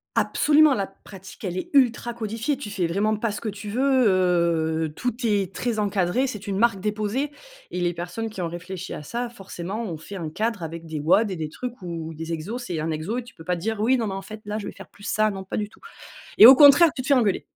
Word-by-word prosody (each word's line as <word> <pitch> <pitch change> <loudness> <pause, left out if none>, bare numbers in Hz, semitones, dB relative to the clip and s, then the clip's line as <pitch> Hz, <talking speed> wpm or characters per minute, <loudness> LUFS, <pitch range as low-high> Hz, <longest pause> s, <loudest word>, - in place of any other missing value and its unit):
Absolument: 300 -1 +4
la 200 - -1
pratique 195 0 -14
elle 185 -2 -3
est 185 - -5
ultra 240 -3 +3
codifiée, 230 +4 -2
tu 265 -6 -7
fais 195 -3 -1
vraiment 200 +6 +1
pas 220 +1 -1
ce 205 - -6
que 220 - -3
tu 205 +1 -7
veux, 260 +2 +3
heu, 170 -4 +1
tout 245 - -1
est 200 -4 +1
très 235 -3 -1
encadré, 205 +4 +1
c'est 210 -5 -6
une 200 -2 -2
marque 230 -3 +3
déposée 215 +8 -2 0.4
et 180 - -3
les 175 -1 0
personnes 180 +7 -4
qui 215 - -10
ont 175 - -1
réfléchi 180 +2 -7
à - - -6
ça, 235 +11 -4
forcément, 195 -1 -6
ont 175 -8 -4
fait 160 +6 -10
un 165 -5 -4
cadre 215 +4 -2
avec 165 +1 -6
des 155 -2 -5
WOD 200 +8 +3
et - - -3
des 155 -2 -4
trucs 245 +5 -7
où 165 -2 -5
des 165 +1 -6
exos, 170 +10 -4
c'est 170 -7 -3
un 160 +1 -2
exo 160 +9 -3
et 250 - -3
tu 240 - -15
peux 160 - -13
pas 180 +2 -1
dire: 210 +5 -3
«Oui, 255 +4 +3
non 230 - -1
mais, 200 - -3
en 195 - -4
fait 215 +1 -9
là, 210 +1 -3
je 205 - -6
vais - - -5
faire - - -12
plus 200 - -19
ça». 215 +1 +1
Non 195 -1 -6
pas 190 - -5
du 210 - -1
tout 215 - -21 0.6
et 215 - +11
au 260 +3 +12
contraire 290 +4 +8
tu - - -4
te 255 - -7
fais 285 - +5
engueuler. 230 -7 +2
205 Hz, 260 wpm, -24 LUFS, 175-230 Hz, 0.6 s, au